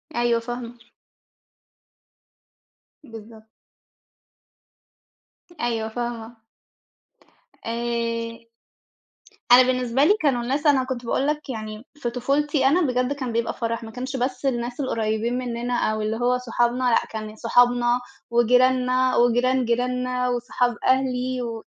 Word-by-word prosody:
أيوه، 240 -1 +2
فاهمة. 240 0 -7 2.3
بالضبط. 225 -2 -12 2.2
أيوه، 225 -2 -1
فاهمة 235 0 -5 1.3
آآ 230 0 -3 1.0
أنا 250 +1 +9
بالنسبة 255 +1 +1
لي 365 - +6
كانوا 270 -6 +2
الناس 275 +5 -2
أنا 280 -3 +4
كنت 255 -2 -5
باقول 265 +4 0
لك 300 -1 -2
يعني 215 0 -6
في 245 -5 -2
طفولتي 275 +3 0
أنا 315 +7 +4
بجد 255 -2 0
كان 260 -4 -4
بيبقى 230 0 -1
فرح، 230 0 -3
ما 225 - -8
كانش 255 +3 -5
بس 255 +2 -2
الناس 240 -1 -2
القريبين 230 -2 -1
مننا 245 -1 -3 0.2
أو 215 0 -2
اللي 215 +1 -1
هو 245 +1 +2
صحابنا 245 0 0
لأ، 245 -2 +3
كان 215 -1 -6
صحابنا 245 +1 +3 0.3
وجيراننا 255 +2 +3
وجيران 245 +2 +3
جيراننا 250 +1 0
وصحاب 245 0 0
أهلي، 255 -1 +1
و 230 -2 -5
245 Hz, 115 wpm, -23 LUFS, 230-255 Hz, 2.3 s, أنا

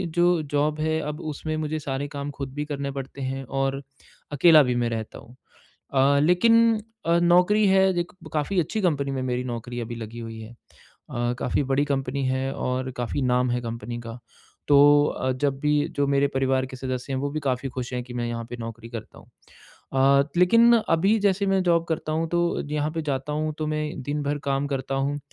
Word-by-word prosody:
जो 175 -1 +3
जॉब 150 +1 +1
है 160 0 0
अब 150 - -6
उसमें 155 +2 -4
मुझे 155 0 -2
सारे 140 -1 -3
काम 140 +1 -4
खुद 135 -1 -5
भी 150 - -2
करने 140 -2 -4
पड़ते 135 0 -7
हैं 135 +1 -3
और 135 +1 -2 0.5
अकेला 155 +1 +6
भी 125 -2 0
मैं 120 -1 0
रहता 110 -1 -5
हूँ 120 - -16 0.6
अ, 140 +1 +4
लेकिन 225 +7 +4 0.3
अ, 170 +1 +4
नौकरी 180 +5 +4
है 190 0 +5
एक 170 - -5 0.2
काफ़ी 155 +6 0
अच्छी 175 +7 -2
कंपनी 140 -6 +1
में 130 -1 -2
मेरी 125 0 -2
नौकरी 120 0 -5
अभी 120 0 -5
लगी 115 0 -8
हुई 115 -1 -7
है। 110 0 -9 0.6
अ, 120 0 -1
काफ़ी - - 0
बड़ी 140 +2 +3
कंपनी 135 -1 -1
है 130 +1 -1
और 130 +1 -2
काफ़ी 120 +3 -2
नाम 125 0 +2
है 120 0 0
कंपनी 115 0 -5
का 115 0 -8 0.5
तो 145 - +6 0.3
अ, 130 - -2
जब 135 +1 -1
भी 150 0 +1 0.2
जो 140 0 +2
मेरे 140 0 +3
परिवार 130 0 +1
के 130 - -9
सदस्य 130 +1 -4
हैं - - -1
वो 145 - -2
भी 155 +2 -3
काफ़ी 130 +1 -1
खुश 125 0 -5
हैं 125 - -2
कि 125 0 -10
मैं 120 -1 -2
यहाँ 115 0 -4
पे 120 - -5
नौकरी 115 0 -7
करता 115 -3 -8
हूँ। - - -16 0.7
अ, 135 +1 +4
लेकिन 230 +6 +6 0.2
अभी 195 +7 +3
जैसे 200 0 +2
मैं 195 -1 +2
जॉब 170 -2 +3
करता 155 -1 -2
हूँ 160 +1 -1
तो 170 0 +1
यहाँ 150 0 0
पे 160 - -2
जाता 140 0 -3
हूँ 155 +1 -1
तो 155 - -2
मैं 155 0 -1 0.2
दिन 145 +3 -2
भर 145 +1 -1
काम 135 +1 0
करता 135 0 -3
हूँ 140 +2 -1
140 Hz, 210 wpm, -25 LUFS, 125-155 Hz, 0.7 s, अकेला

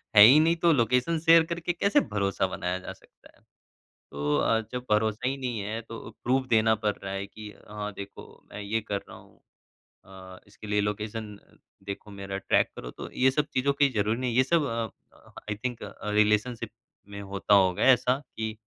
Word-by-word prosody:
है 105 - +11
ही 135 +7 +8
नहीं 165 +2 +3
तो 170 - +7
लोकेशन 125 +6 +1
शेयर 165 +1 +6
करके 170 +1 -3
कैसे 200 +4 +3
भरोसा 100 -1 0
बनाया 90 0 -3
जा 95 - -8
सकता - - -22
है। - - -29 0.7
तो 75 +1 0
अ, 115 0 +2
जब 125 0 -4
भरोसा 110 +3 +1
ही 135 - -2
नहीं 125 -5 -3
है 110 +3 -4
तो 115 0 -9 0.2
प्रूफ़ 130 +1 +1
देना 110 -1 +4
पड़ 105 -1 -1
रहा 95 0 -5
है 100 0 -4
कि 105 +1 -11 0.2
हाँ, 105 0 -5
देखो 100 0 -11
मैं 105 - -7
ये 110 +2 -1
कर 100 -1 0
रहा - - -11
हूँ - - -21 0.6
अ, 95 -1 -12
इसके 100 +1 -13
लिए 105 0 +1
लोकेशन 105 0 -4 0.5
देखो 100 +1 -7
मेरा 100 -1 -6
ट्रैक - - +2
करो - - -7
तो - - -9
ये 130 +1 +3
सब 150 +2 0
चीज़ों 135 +2 +2
की 140 0 +3
ज़रूरी 110 +2 0
नहीं 125 -1 -1
है। 115 - -3
ये 130 - +6
सब 160 +2 +2
अ 115 -3 -6
अ, - - -21 0.2
आई 105 - 0
थिंक 120 -2 -3
अ, - - -7 0.2
रिलेशनशिप 105 +3 +1 0.4
में 100 0 -8
होता 100 +1 0
होगा 95 -2 +3
ऐसा 130 0 +4 0.2
कि 110 0 -3
110 Hz, 205 wpm, -27 LUFS, 100-125 Hz, 0.7 s, है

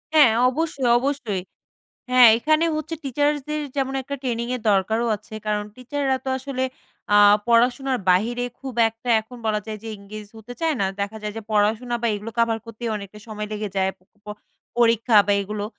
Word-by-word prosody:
হ্যাঁ 285 -8 +7 0.2
অবশ্যই, 310 -1 -2
অবশ্যই 265 -8 -2 0.7
হ্যাঁ 250 -1 +8
এখানে 310 +6 +2
হচ্ছে 310 +1 -4
টিচার্সদের 290 +2 -1 0.2
যেমন 270 -1 -1
একটা 280 +2 -5
ট্রেনিংয়ের 240 -1 -2
দরকারও 220 +4 +1
আছে 215 +2 -14
কারণ 210 0 0
টিচাররা 265 +1 -1
তো - - -4
আসলে 265 -1 -4 0.5
আ - - +7 0.3
পড়াশোনার 250 +3 +3
বাহিরে 235 +7 +1 0.2
খুব 265 -3 -7 0.2
একটা 225 +2 -12
এখন 235 +3 -13
বলা 210 -1 +1
যায় 215 -1 -5
যে 225 - -7
engage 205 +1 -10
হতে 220 +3 -10
চায় 325 -2 +1
না 195 - +2
দেখা 200 +2 -3
যায় 210 0 -4
যে 225 - -5
পড়াশোনা 215 +4 +1
বা - - +2
এগুলো 210 +2 -6
কাভার 230 -1 +2
করতেই 230 +1 -5
অনেকটা 200 0 -9
সময় 210 -1 -5
লেগে 210 0 -3
যায় 190 0 +1
প - - -64 0.8
পরীক্ষা 230 -1 +3
বা 205 - +3
এগুলো 205 +1 -4
235 Hz, 170 wpm, -23 LUFS, 210-265 Hz, 0.8 s, হ্যাঁ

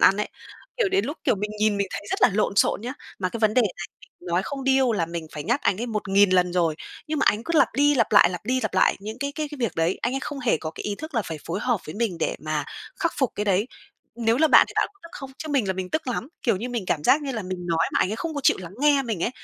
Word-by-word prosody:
ăn 195 - +6
ấy. 210 - -2 0.5
Kiểu, 475 -5 +2
đến 390 +1 +1
lúc, 290 - -4
kiểu, - - +3
mình 210 +2 -4
nhìn 210 -1 +2
mình 200 - 0
thấy - - -4
rất - - -2
là - - +8
lộn 200 0 0
xộn - - +3
nhá. 245 +4 -4 0.3
Mà 185 -1 0
cái 230 - -6
vấn 215 -1 +3
đề 250 - +5
này 200 - -1 0.5
mình 175 - -10
nói 175 +2 +1
không 275 -2 -5
điêu 265 -3 +3
là 170 -6 0
mình 170 -1 -5
phải 150 - -5
nhắc 240 +5 0
anh 195 - +1
ấy 240 - -2
1000 205 -3 +2
lần 180 -1 +3
rồi, 170 -3 +1 0.3
nhưng 310 0 -2
mà - - +2
ảnh 210 +2 +1
cứ 335 +1 +1
lặp - - +5
đi 290 +3 +4
lặp 230 -6 +1
lại, - - +7
lặp 180 -2 -5
đi 255 +3 0
lặp - - -2
lại - - +4
những 215 +4 -7
cái 280 +2 -3
cái 305 -2 -3
cái 295 - -9
việc 230 -7 0
đấy, 165 +3 +1
anh 240 +3 0
ấy 270 - -1
không 290 +1 -5
hề 245 -9 +2
có 155 - -5
cái - - -8
ý 205 - -2
thức 315 +7 -9
là 225 - +1
phải 160 -5 -6
phối 175 +4 -3
hợp 240 -5 0
với 155 - -7
mình 210 -5 -1
để - - -1
mà - - -2 0.4
khắc 335 -3 +1
phục 265 -4 +1
cái 210 - -2
đấy. 200 +1 +2 0.5
Nếu 230 -1 +2
là 315 +1 +4
bạn - - +7
thì - - -9
bạn - - +3
có 400 - -30
tức 335 - -11
không? 270 -1 -8
Chứ 315 - -6
mình 275 -7 +1
là 190 - +1
mình 185 -1 -5
tức 315 -3 -2
lắm, 245 +1 -3
kiểu 230 -6 +2
như 235 +6 -4
mình 235 -6 -3
cảm 150 -4 -1
giác 295 - +4
như 275 -2 -3
là 225 -3 -3
mình 180 -1 -5
nói 165 -1 +1
mà - - +2
ảnh 185 - +2
ấy 215 - -3
không 320 +5 -4
có 285 - -2
chịu - - +5
lắng 180 -1 -9
nghe 290 -1 +4
mình 220 -9 -3
ấy. - - +1
220 Hz, 320 wpm, -24 LUFS, 185-270 Hz, 0.5 s, là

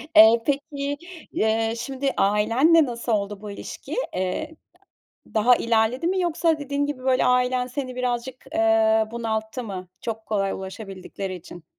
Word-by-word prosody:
E, 230 -3 +8
peki, 285 0 -2 0.3
eee, 225 +1 +1
şimdi 270 +2 -2
ailenle 230 +11 +4
nasıl 235 -1 -4
oldu 205 -1 -1
bu 210 -1 -7
ilişki? - - -7 0.2
Eee, 185 +13 -2 0.8
daha 240 +3 +5
ilerledi 230 +6 +1
mi 375 +1 +1
yoksa 335 -2 +1
dediğin 285 0 -1
gibi 285 -3 -5
böyle 260 -1 +3
ailen 250 0 +2
seni 255 0 -5
birazcık, 250 0 -2 0.2
eee, 220 0 +4
bunalttı 225 +1 -3
mı 185 -4 -6
çok 225 -2 -5
kolay 195 -2 0
ulaşabildikleri 190 -1 -6
için? 175 -1 -11
235 Hz, 135 wpm, -24 LUFS, 215-270 Hz, 0.8 s, E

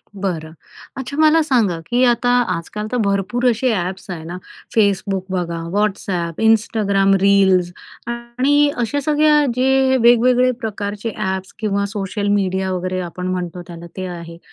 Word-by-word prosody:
बरं. 170 -5 -4 0.4
अच्छा, 265 +2 -6
मला 315 +1 +5
सांगा, 230 - +1
की 245 +1 +2
आता 245 0 +2 0.3
आजकाल 210 +6 -6
तर 250 - 0
भरपूर 200 +5 -1
असे 245 +2 +1
ॲप्स 185 0 -4
आहे 165 -3 -6
ना, 175 +3 -6 0.4
Facebook 200 -2 +2
बघा, 170 -2 -2 0.2
WhatsApp, 190 -5 -1
Instagram 205 -3 +2
रील्स 190 -3 +4 0.4
आणि 250 +5 +1
अशा 265 +5 -1
सगळ्या 300 0 +3
जे 265 +1 +3
वेगवेगळे 245 +2 +4
प्रकारचे 210 0 -4
ॲप्स 190 -2 -3
किंवा 200 -2 0
सोशल 205 0 -3
मीडिया 190 -1 0
वगैरे 185 0 -2
आपण 180 +1 -5
म्हणतो 180 -1 -3
त्याला 170 -1 -9
ते 185 - -3
आहे. 170 0 -10
200 Hz, 140 wpm, -19 LUFS, 185-245 Hz, 0.4 s, मला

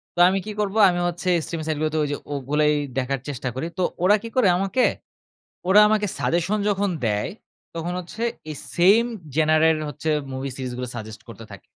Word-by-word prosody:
তো - - -4
আমি 195 +1 0
কি 215 - -5
করব? 200 0 -2
আমি 175 0 -1
হচ্ছে 175 +2 -3
স্ট্রিমিং 165 -2 -5
সাইটগুলোতে 155 0 -1
ওযে 145 0 -1 0.2
ওগুলোই 150 +2 +1 0.2
দেখার 135 +1 -2
চেষ্টা 130 -2 -3
করি। 135 +6 -3
তো 185 - +2 0.2
ওরা 205 +3 +6
কি 230 - -5
করে? 245 - +5
আমাকে 195 +7 +1 0.9
ওরা 205 +2 +8
আমাকে 210 -1 +2
সাজেশন 175 +5 0
যখন 200 0 +1 0.2
দেয় 105 -1 -1 0.5
তখন 170 +2 -3
হচ্ছে 180 +6 -9 0.3
এই 150 - -7 0.2
সেম 200 +7 +5 0.3
জেনারের 155 0 +4
হচ্ছে 150 +3 -4 0.2
মুভি 135 +1 -4
সিরিজগুলো 125 -1 -5
সাজেস্ট 110 -1 -8
করতে 115 0 -10
থাকে। 95 - -13
160 Hz, 175 wpm, -23 LUFS, 135-195 Hz, 0.9 s, ওরা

